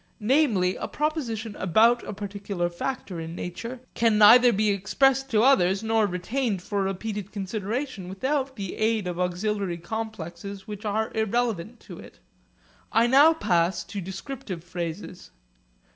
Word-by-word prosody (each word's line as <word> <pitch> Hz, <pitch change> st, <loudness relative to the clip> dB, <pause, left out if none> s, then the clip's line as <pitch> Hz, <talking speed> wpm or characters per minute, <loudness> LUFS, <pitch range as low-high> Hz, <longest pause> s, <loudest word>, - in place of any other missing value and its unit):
Namely, 215 Hz, -7 st, +2 dB
a -, -, -4 dB
proposition 240 Hz, -9 st, -3 dB
about 225 Hz, +7 st, +4 dB
a -, -, -7 dB
particular 200 Hz, -3 st, -4 dB
factor 185 Hz, -1 st, -4 dB
in 165 Hz, +1 st, -6 dB
nature 230 Hz, +9 st, -6 dB
can 225 Hz, -2 st, +2 dB
neither 240 Hz, +4 st, +8 dB
be 215 Hz, 0 st, +2 dB
expressed 270 Hz, +7 st, +2 dB
to 220 Hz, -3 st, +3 dB
others 195 Hz, -7 st, +4 dB
nor 220 Hz, -1 st, +2 dB
retained 200 Hz, +2 st, -2 dB
for 200 Hz, 0 st, -2 dB
repeated 200 Hz, +1 st, -3 dB
consideration 210 Hz, +1 st, -4 dB
without 265 Hz, +7 st, -2 dB
the 195 Hz, -5 st, -5 dB
aid 220 Hz, -2 st, +1 dB
of 180 Hz, -1 st, -4 dB
auxiliary 180 Hz, 0 st, -1 dB
complexes 195 Hz, -1 st, -6 dB
which 210 Hz, 0 st, -8 dB
are 215 Hz, +1 st, -1 dB
irrelevant 220 Hz, -1 st, -1 dB
to -, -, -11 dB
it. -, -, -13 dB, 0.7 s
I 230 Hz, -, +4 dB
now 285 Hz, +6 st, +6 dB
pass 175 Hz, -, +1 dB
to 200 Hz, +2 st, -6 dB
descriptive 190 Hz, -, -7 dB
phrases. 175 Hz, +1 st, -6 dB
210 Hz, 140 wpm, -26 LUFS, 185-235 Hz, 0.7 s, neither